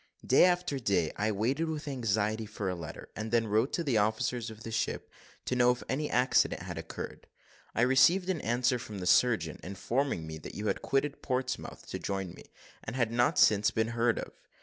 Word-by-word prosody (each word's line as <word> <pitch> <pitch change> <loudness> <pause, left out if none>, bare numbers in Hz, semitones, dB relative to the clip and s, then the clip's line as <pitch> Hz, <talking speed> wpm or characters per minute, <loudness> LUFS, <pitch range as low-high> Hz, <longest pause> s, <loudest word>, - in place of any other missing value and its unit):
"Day - - +6
after 180 -6 +1
day 95 -9 +1
I 110 +1 0
waited 130 +11 0
with 155 -1 -4
anxiety 110 -4 -1
for 105 -2 -4
a 90 - 0
letter, 85 -3 -8
and 110 +1 -4
then 115 0 +2
wrote 110 +5 +1
to 170 - 0
the 130 -8 +2
officers 110 +3 0
of 110 +1 -11
the 115 - -6
ship 115 - -2 0.3
to 125 - -1
know 125 0 +5
if 125 0 0
any 150 +3 -1
accident 125 +1 +2
had - - -5
occurred. - - -7 0.5
I - - +2
received 165 +9 +5
an 185 -5 -1
answer 125 +2 +1
from 105 -3 -7
the 90 - -5
surgeon, 90 -6 +3
informing 100 - -2
me 80 0 -7
that - - -9
you 105 - -4
had - - -1
quitted 140 +1 -1
Portsmouth 130 -1 -3
to - - -4
join 95 -3 -3
me, - - -13 0.4
and - - -5
had 120 -3 +1
not 120 +1 +2
since 105 0 +5
been 110 0 0
heard 120 0 +1
of. - - -5
115 Hz, 205 wpm, -30 LUFS, 105-130 Hz, 0.5 s, Day